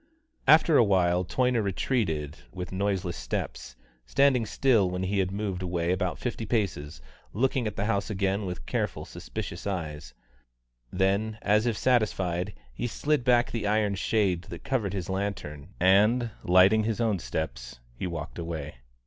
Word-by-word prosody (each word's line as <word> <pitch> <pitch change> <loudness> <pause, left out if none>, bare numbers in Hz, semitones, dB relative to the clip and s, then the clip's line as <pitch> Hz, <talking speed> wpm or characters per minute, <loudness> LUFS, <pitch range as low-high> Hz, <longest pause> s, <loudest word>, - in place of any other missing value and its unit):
After 155 0 +6
a - - +7
while 90 -3 +2
Toyner 125 +5 +1
retreated 90 - -1 0.2
with 90 +3 -6
noiseless 95 -2 -1
steps, 85 - -5 0.3
standing 130 - +3
still 115 -9 +3
when 90 +1 -3
he 100 +2 0
had 95 -1 +1
moved 100 -2 -3
away 85 -1 -1
about 90 -3 -1
fifty - - -4
paces, 75 - -2 0.3
looking 125 +1 +1
at 105 - -4
the 100 - -1
house 100 -3 0
again 100 0 -1
with 90 -9 -6
careful, - - -2
suspicious - - -6
eyes; 75 -9 -5 0.8
then, 100 +4 +1
as 105 +3 +3
if 115 -3 0
satisfied, 95 - +1 0.2
he 90 - -3
slid 145 +3 0
back 120 -1 +3
the 110 -3 -2
iron 105 -1 +2
shade 95 -3 0
that - - -9
covered 120 -9 -1
his 95 -4 -3
lantern 95 -5 -4
and, 105 +6 +4
lighting 95 +5 +5
his 115 0 -1
own 110 -5 +1
steps, 70 -8 -5
he - - -4
walked 85 -1 -6
away. 80 -5 -5
100 Hz, 155 wpm, -27 LUFS, 90-110 Hz, 0.8 s, a